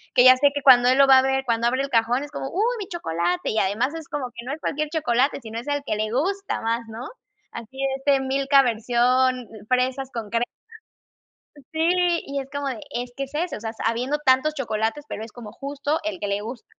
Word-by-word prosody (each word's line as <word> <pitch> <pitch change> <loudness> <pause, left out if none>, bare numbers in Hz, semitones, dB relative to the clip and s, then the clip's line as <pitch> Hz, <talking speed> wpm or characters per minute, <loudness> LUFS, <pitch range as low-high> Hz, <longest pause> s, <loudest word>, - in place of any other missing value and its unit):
que 245 - +7
ya 255 0 +10
sé 285 +2 +5
que 285 - -2
cuando 250 -2 +7
él 260 - +4
lo 275 0 +6
va 265 -1 +8
a - - +4
ver, 265 0 0
cuando 235 0 +1
abre 260 +3 +1
el 275 - -4
cajón, 235 +3 +2
es 290 - -9
como: 270 - -5
"Uy, 440 - 0
mi 395 - -5
chocolate". 175 - -2
Y 220 - 0
además 225 +9 0
es 325 -3 -7
como 255 -4 -4
que 235 0 -9
no 270 - -3
es 315 - -6
cualquier 305 0 -2
chocolate, 275 -3 +1
sino 225 -1 -6
es 245 - -10
el 285 0 -1
que - - -1
le 215 0 -2
gusta 385 - -1
más, 230 +1 0
¿no? 225 +3 -7 0.5
Así 230 +3 -10
de 275 0 0
este 275 0 +2
Milka 275 +1 +3
versión, 250 +2 +2
eh, 220 -3 -13
fresas 255 +1 0
con 225 -3 -5
cre 235 +1 0 1.1
eh, 290 - -14
sí, 345 +2 +2
y 280 0 -3
es 270 - -8
como 285 -1 -3
de, 250 -5 -4
es 245 -1 -4
que 275 - -2
es 275 +2 -15
ese, 345 +3 -2
o - - -9
sea, 225 0 -4
habiendo 250 +6 0
tantos 295 +1 +3
chocolates, 225 +2 -2
pero 210 - -5
es 225 - -12
como 225 -4 -10
justo 285 +2 -2
el 315 - -3
que 205 - -3
le 200 +1 -1
gusta. 230 +2 -8
260 Hz, 245 wpm, -23 LUFS, 235-285 Hz, 1.1 s, ya